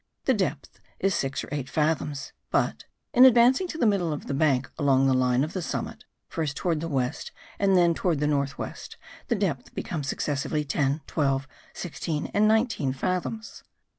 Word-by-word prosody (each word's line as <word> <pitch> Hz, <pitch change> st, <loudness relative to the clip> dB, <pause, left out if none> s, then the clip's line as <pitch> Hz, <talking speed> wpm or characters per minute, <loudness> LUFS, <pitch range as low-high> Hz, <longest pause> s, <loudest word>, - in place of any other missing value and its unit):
The 265 Hz, -, +4 dB
depth 185 Hz, -, -3 dB, 0.2 s
is 195 Hz, 0 st, +2 dB
six 135 Hz, -4 st, -1 dB
or -, -, -9 dB
eight 140 Hz, -3 st, -3 dB
fathoms; 150 Hz, -2 st, -1 dB, 0.2 s
but, -, -, 0 dB, 0.3 s
in 250 Hz, -1 st, +7 dB
advancing 260 Hz, +6 st, +6 dB
to 325 Hz, -, -6 dB
the 250 Hz, -, +2 dB
middle 195 Hz, -6 st, +2 dB
of 150 Hz, -, -5 dB
the -, -, -3 dB
bank, 135 Hz, -3 st, +2 dB
along 135 Hz, -2 st, +4 dB
the 135 Hz, -, +4 dB
line 130 Hz, 0 st, +2 dB
of 155 Hz, -, -4 dB
the 185 Hz, -, -2 dB
summit, -, -, -4 dB, 0.2 s
first 155 Hz, -3 st, -3 dB
towards 165 Hz, -4 st, 0 dB
the 165 Hz, -, -3 dB
west 130 Hz, -5 st, -2 dB, 0.3 s
and 195 Hz, -2 st, +4 dB
then 170 Hz, -1 st, +5 dB
towards 165 Hz, -2 st, 0 dB
the 150 Hz, -, +1 dB
north 140 Hz, -1 st, 0 dB
west, -, -, -7 dB, 0.3 s
the 235 Hz, -, +1 dB
depth 170 Hz, -, -2 dB
becomes 150 Hz, -5 st, -4 dB
successively 145 Hz, +2 st, -1 dB
ten, 140 Hz, +1 st, 0 dB
twelve, 135 Hz, -2 st, 0 dB, 0.3 s
sixteen 160 Hz, -3 st, -4 dB
and 210 Hz, +1 st, +4 dB
nineteen 220 Hz, -, +2 dB
fathoms. 185 Hz, -, -3 dB
155 Hz, 180 wpm, -26 LUFS, 140-190 Hz, 0.3 s, in